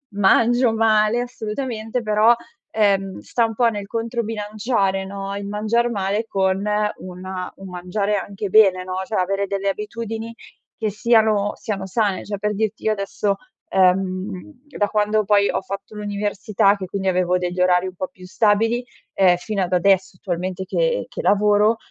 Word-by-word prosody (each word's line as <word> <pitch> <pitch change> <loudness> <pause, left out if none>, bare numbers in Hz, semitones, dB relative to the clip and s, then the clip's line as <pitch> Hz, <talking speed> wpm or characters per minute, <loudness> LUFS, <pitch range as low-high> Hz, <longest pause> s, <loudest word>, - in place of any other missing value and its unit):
mangio 230 +4 +4
male, 220 +1 +3
assolutamente, 235 0 -4
però, 215 +2 +4 0.4
uhm, 195 -2 +2
sta 235 - -1
un 225 -1 -4
po' 240 0 +3
nel 205 -2 -5
controbilanciare, 215 -3 -1
no, 195 0 -5
il 200 0 -5
mangiar 220 +3 +1
male 205 +1 -1
con 190 0 +1 0.4
una 185 0 -6
un 195 - -10
mangiare 185 +3 -2
anche 200 +1 -4
bene, 190 -3 +5
no, 185 - -5
cioè, 215 - -4
avere 195 +2 0
delle 200 0 -2
abitudini 225 +2 -4 0.4
che 220 -2 -1
siano 215 -1 +2
siano 200 -5 -4
sane. 200 0 -1
Cioè, 205 -1 -4
per 210 0 -1
dirti 215 0 -2
io 220 - +3
adesso 200 0 -1 0.3
uhm, 185 +6 0 0.2
da 205 - +2
quando 210 0 +1
poi 200 0 +3
ho - - -1
fatto 195 +2 -7
l'università, 205 -1 +1
che 190 -2 -6
quindi 195 0 -3
avevo 180 -1 +2
degli 180 0 -2
orari 180 0 +3
un 185 - -6
po' 185 +1 -3
più 185 -1 -14
stabili, 225 +5 +2 0.3
ehm, 180 -2 +4
fino 200 +1 -3
ad 180 - -4
adesso, 190 +1 +2
attualmente 185 +1 -3
che - - 0
che - - -5
lavoro, 210 +2 +3
205 Hz, 160 wpm, -21 LUFS, 190-220 Hz, 0.4 s, bene